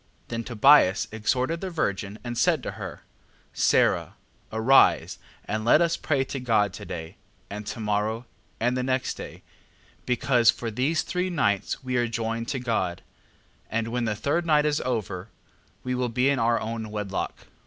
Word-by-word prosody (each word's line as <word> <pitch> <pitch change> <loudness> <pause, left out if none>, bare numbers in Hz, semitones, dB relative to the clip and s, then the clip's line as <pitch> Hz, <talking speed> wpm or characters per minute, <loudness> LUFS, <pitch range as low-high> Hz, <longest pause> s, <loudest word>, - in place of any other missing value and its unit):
8:4. - - -37
Then 115 -1 -3
Tobias 115 -3 +5
exhorted 125 +9 -1
the 190 - -3
virgin, 100 - -2
and 120 -1 -4
said - - +2
to - - -3
her: - - -8 0.5
Sara, - - +2 0.4
arise, 115 +5 +4 0.3
and 110 +1 -2
let 120 +6 +5
us 170 0 +2
pray 140 -5 0
to 135 +1 -5
God 110 -6 +1
to - - -8
day, 80 -1 -7 0.3
and 105 +1 -6
to - - -5
morrow, 110 +2 -1 0.3
and 120 +2 +1
the 130 - 0
next 130 0 0
day: - - -9 0.6
because 125 -2 +3
for 115 -2 0
these 135 +8 0
three 180 0 -2
nights 115 - 0
we 130 -1 -1
are 120 0 +2
joined 115 0 -3
to 140 - -2
God: 110 -8 -2 0.7
and 115 0 -1
when 120 0 -1
the 105 -1 -1
third 145 +10 0
night 150 -3 +3
is 150 0 +1
over, 105 -6 -3 0.5
we 125 - -2
will 125 -1 -1
be 125 +4 +2
in 140 -2 +1
our 115 0 +2
own 110 0 -4
wedlock. 105 -2 -4
120 Hz, 175 wpm, -26 LUFS, 110-130 Hz, 0.7 s, Tobias